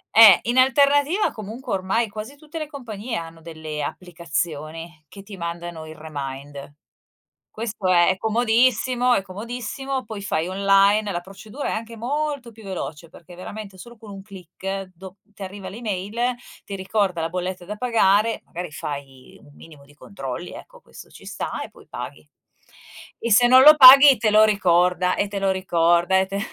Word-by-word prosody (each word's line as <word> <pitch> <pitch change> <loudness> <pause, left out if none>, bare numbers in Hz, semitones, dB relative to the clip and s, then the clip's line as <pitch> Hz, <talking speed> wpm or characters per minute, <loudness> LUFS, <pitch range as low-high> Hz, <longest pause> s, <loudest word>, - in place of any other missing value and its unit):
Eh, 220 -5 +9
in 240 +2 -1
alternativa 285 +7 +3
comunque 220 +2 -7
ormai 195 +5 0
quasi 215 +6 -8
tutte 310 +2 -9
le 305 - -5
compagnie 235 -5 -7
hanno 165 0 -7
delle 155 -2 -7
applicazioni 165 -1 -5
che 195 +6 -13
ti 200 -2 -11
mandano 170 -1 -6
il 155 - -10
remind. 140 -2 -8 0.8
Questo 215 -4 -4
è 175 -1 +4
è 190 - +1
comodissimo, 240 +3 +1
è - - +1
comodissimo, 245 +7 -5
poi 215 -2 -7
fai 175 -4 -2
online, 195 +2 +3
la 175 - -3
procedura 205 +8 -8
è - - -2
anche 230 +1 -6
molto 280 0 -3
più 220 0 -16
veloce 165 -4 -7
perché 175 +1 -15
veramente 195 +2 -9
solo 235 +4 -13
con 220 -2 -13
un 195 -1 -9
click, 195 0 -7
do 190 +2 -12
ti 205 -1 -15
arriva 195 +1 -8
l'email, 220 +3 -3 0.3
ti 200 - -6
ricorda 190 -2 -1
la 165 - -1
bolletta 180 +1 -5
da 210 +2 -6
pagare, 225 -2 +2
magari 175 -1 -7
fai 135 -2 -8
un 145 - -19
minimo 150 -3 -16
di 145 - -21
controlli, 150 -1 -8
ecco, - - -13
questo - - -15
ci - - -15
sta, - - -5
e - - -7
poi - - -19
paghi. - - -8 0.9
E 235 - -3
se 245 +4 +6
non 255 +1 +7
lo 305 +1 +9
paghi, 275 0 +10
te 215 0 +1
lo 215 +1 +6
ricorda, 180 -3 +2
e 200 - -1
te 200 0 -5
lo 195 - +1
ricorda, 175 -1 +2
e 190 - +1
te 195 +1 -5
195 Hz, 170 wpm, -22 LUFS, 175-230 Hz, 0.9 s, paghi